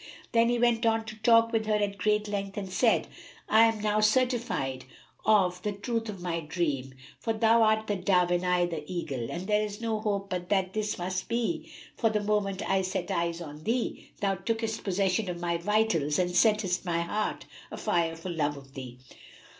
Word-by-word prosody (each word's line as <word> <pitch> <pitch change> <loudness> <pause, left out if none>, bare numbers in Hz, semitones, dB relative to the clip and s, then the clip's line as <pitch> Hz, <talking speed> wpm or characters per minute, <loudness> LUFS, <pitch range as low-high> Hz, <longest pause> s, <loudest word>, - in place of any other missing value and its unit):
Then 230 0 +4
he 240 - +2
went 235 -1 +2
on 225 -1 +2
to 220 - -7
talk 230 +1 +5
with 220 -2 0
her 215 - +2
at 200 -1 -1
great 210 +2 +1
length 200 -1 -4
and 200 -2 -3
said, 225 +4 +3 0.4
"I 220 +1 +6
am 225 -2 0
now 210 0 +1
certified 215 - +1 0.4
of 185 -4 +3
the 210 +1 -2
truth 225 +2 -3
of 195 -4 -7
my 170 -2 -1
dream, 150 -5 -2 0.2
for 225 - -1
thou 225 +1 +4
art 220 0 +3
the 205 -2 -1
dove 180 -1 +2
and 175 0 +1
I 180 -1 +2
the 165 -3 -4
eagle, 140 -10 -3
and 175 +2 -4
there 210 +1 +2
is 205 0 -5
no 225 -2 -1
hope 200 -2 -2
but 180 -1 -3
that 190 -2 +1
this 210 -1 -1
must 185 +1 -3
be, 240 +8 -1 0.2
for, 225 - +2
the 215 -1 0
moment 205 -2 0
I 195 0 +2
set 185 +1 -3
eyes 170 -2 -1
on 150 -1 -9
thee, 235 +4 -2
thou 195 -1 +1
tookest 225 +3 -2
possession 195 +1 0
of 175 -1 -4
my 170 -1 0
vitals 175 -6 +1
and 180 -1 +1
settest 190 0 +2
my 170 -2 0
heart 210 +5 -2 0.2
a - - -7
fire 170 -6 0
for 165 +2 -6
love 145 -3 -1
of 135 -1 -14
thee!" 130 -3 -8
200 Hz, 200 wpm, -28 LUFS, 175-220 Hz, 0.4 s, I